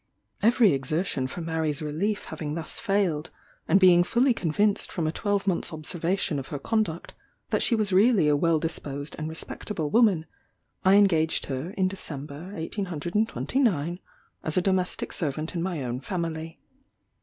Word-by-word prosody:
Every 230 - +5
exertion 135 0 -1
for 170 - -6
Mary's 160 -3 -1
relief 165 +8 -2
having 150 -1 -4
thus 165 -1 -3
failed; 195 -8 0 0.4
and 195 - +5
being 180 -2 +7
fully 245 +7 +3
convinced 205 +3 +1
from 170 - -2
a 155 - +1
twelvemonth's 195 -1 -1
observation 165 0 -1
of 135 - -7
her 145 - -4
conduct, 195 0 -2 0.4
that - - +1
she 235 - +3
was 210 -3 0
really 200 -4 +5
a 150 - +4
well 165 +2 +2
disposed 145 -3 -4
and 155 0 -3
respectable 160 0 -4
woman; 210 -9 +4 0.6
I 190 +1 +6
engaged 165 -6 +3
her, 135 +4 -4
in 190 -1 +3
December 155 -3 -7
1829, 180 - -1 0.4
as - - 0
a - - +5
domestic 185 -1 0
servant 155 0 -2
in 170 - -2
my 170 -5 -2
own 125 0 -3
family. 165 -1 -4
170 Hz, 150 wpm, -26 LUFS, 155-195 Hz, 0.6 s, being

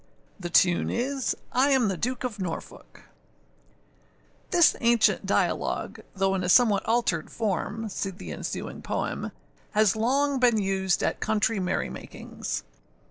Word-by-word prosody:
The 175 -2 -5
tune 175 0 +3
is, 265 +2 -1
I 260 +3 +3
am 260 -5 +3
the 195 - 0
Duke 245 +9 -3
of 230 -5 -4
Norfolk. 180 -3 -7 1.5
[THIS 345 -3 +5
ancient 235 -2 +3
dialogue, - - 0 0.2
though 195 0 +1
in 190 -1 -1
a 180 - -1
somewhat 210 -2 +5
altered 235 +1 +1
form 220 +1 -2
(see 195 -1 -3
the 190 +1 -9
ensuing - - -5
poem), - - -3 0.4
has 215 -2 +4
long 270 +5 +1
been 245 -3 +4
used 190 -2 0
at - - 0
country 220 0 +1
merry 180 -1 -1
makings. - - -6
220 Hz, 135 wpm, -26 LUFS, 190-245 Hz, 1.5 s, THIS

